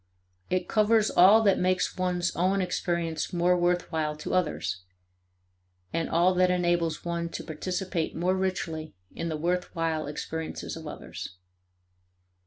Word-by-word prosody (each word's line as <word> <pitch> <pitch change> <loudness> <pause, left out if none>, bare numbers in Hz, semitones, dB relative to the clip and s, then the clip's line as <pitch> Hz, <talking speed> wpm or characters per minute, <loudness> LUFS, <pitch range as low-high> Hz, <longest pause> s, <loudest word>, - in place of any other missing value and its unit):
It 185 - 0
covers 215 0 +3
all 200 +5 +7
that 200 -3 +4
makes 185 0 +1
one's 180 -1 -1
own 185 +3 +2
experience 170 -3 -1
more 175 +1 +3
worth 175 0 +1
while 155 -2 -1
to 150 - -5
others, 150 - 0 1.1
and 165 0 -1
all 175 +3 +4
that 185 0 +3
enables 175 -3 +1
one 170 0 -2
to - - -6
participate 180 +1 -3
more 180 +3 +1
richly 175 - -2 0.2
in 165 - -4
the 155 - -2
worthwhile 165 -2 -1
experiences 160 +2 -5
of - - -8
others. 90 - -7
175 Hz, 135 wpm, -28 LUFS, 165-185 Hz, 1.1 s, all